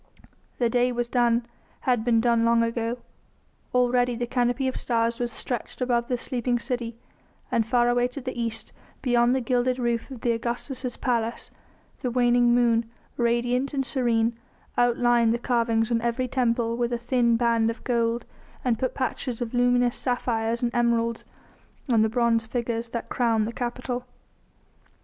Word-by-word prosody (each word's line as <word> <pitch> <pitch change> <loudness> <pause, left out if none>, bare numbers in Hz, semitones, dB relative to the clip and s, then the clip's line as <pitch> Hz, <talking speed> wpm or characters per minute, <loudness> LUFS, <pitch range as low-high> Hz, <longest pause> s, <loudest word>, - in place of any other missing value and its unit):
The 240 - +2
day 245 +2 +2
was 240 0 -1
done, 240 -1 +2 0.4
had 245 -4 +1
been 230 -1 +3
done 235 -1 +3
long 230 0 +4
ago; 230 +1 -1 0.7
already 245 0 +2
the 240 +1 -2
canopy 245 +2 0
of 260 - -1
the - - -5
stars 230 0 0
was 240 -1 -1
stretched 240 +1 -4
over 245 -2 +2
the 245 +1 -2
sleeping 245 0 -1
city, 235 -2 -3 0.5
and 225 -1 +1
far 240 +1 +3
away 245 0 +2
to 250 +3 -8
the 255 0 -4
east, 230 -2 -3 0.3
beyond 240 -1 +3
the 265 - 0
gilded 250 +1 +1
roof 235 -1 -1
of 255 -3 -9
Augustus' 240 +2 -2
palace, 235 -2 -1 0.5
the 250 - -2
waning 240 0 +3
moon, 235 -2 +2 0.3
radiant 245 +3 0
and 270 -1 0
serene, 235 -3 +1 0.4
outlined 240 -1 +3
the - - -1
carvings 230 -2 +1
on 230 -1 +2
every 240 +2 -1
temple 235 -2 0
with 240 0 -1
a 240 - 0
thin 235 -1 +2
band 230 -1 +2
of 230 - -6
gold 235 -1 0 0.4
and 235 -3 +1
put 255 - -1
patches 255 -2 -3
of 240 -1 -4
luminous 245 0 +3
sapphires 235 -2 -1
and 240 0 0
emeralds 235 -1 +1 0.7
on 225 - +5
the 220 - +3
bronze 230 -1 +1
figures 235 -1 -2
that 235 0 -4
crowned 230 -3 +1
the 230 - -4
Capitol. 245 +1 -4
240 Hz, 165 wpm, -25 LUFS, 230-245 Hz, 0.7 s, on